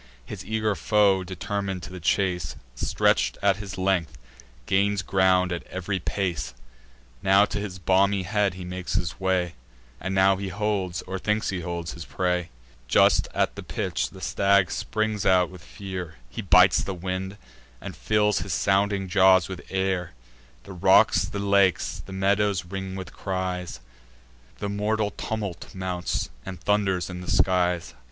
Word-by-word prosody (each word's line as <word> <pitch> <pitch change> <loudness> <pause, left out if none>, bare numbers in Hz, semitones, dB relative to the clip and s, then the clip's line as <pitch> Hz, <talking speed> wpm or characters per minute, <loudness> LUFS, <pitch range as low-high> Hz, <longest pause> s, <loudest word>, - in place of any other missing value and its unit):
His - - -7
eager 110 -1 0
foe, 100 -2 +3
determin'd 95 0 -4
to - - -8
the 90 - -7
chase, 90 -1 0 0.2
Stretch'd - - +1
at 100 -1 +4
his 100 -2 -7
length, 95 -7 0 0.5
gains 100 +1 +1
ground 95 -1 +3
at 85 - -2
ev'ry 95 +1 -3
pace; 85 -9 -2 0.7
Now 95 +1 +5
to 105 - -4
his 100 -3 -5
beamy 95 +2 +2
head 100 0 0
he 90 -1 -7
makes 90 0 -4
his 85 -2 -2
way, 90 -2 0 0.5
And 95 0 -3
now 95 0 +4
he 100 0 -4
holds, 95 -3 -2
or 95 +1 -5
thinks 105 +3 0
he 95 - -2
holds, 85 -1 -4
his 85 0 -8
prey: 90 -2 -1 0.4
Just - - +4
at - - +1
the - - -6
pinch, - - -2
the - - -13
stag 100 -2 +2
springs 110 -1 -1
out 90 -2 +3
with 90 -4 -12
fear; 90 -2 -7 0.2
He - - -5
bites 90 -1 +5
the 95 - -4
wind, 95 +2 -4 0.4
and - - -8
fills 105 -1 +2
his 90 0 -3
sounding 100 +2 +1
jaws 95 -1 +5
with 95 -2 -7
air: 95 -4 -1 0.5
The 95 - -10
rocks, 90 - +4
the - - -6
lakes, 100 -2 +2
the - - -11
meadows 100 -1 +1
ring 95 +1 -5
with 95 -3 -7
cries; 95 -2 -3 0.8
The 100 - -3
mortal 105 +1 0
tumult 100 -4 -5
mounts, 90 -1 -2
and 95 +3 -7
thunders 95 -1 +1
in 90 -1 -7
the 90 - -7
skies. 90 -2 +1
95 Hz, 160 wpm, -25 LUFS, 90-100 Hz, 0.8 s, Now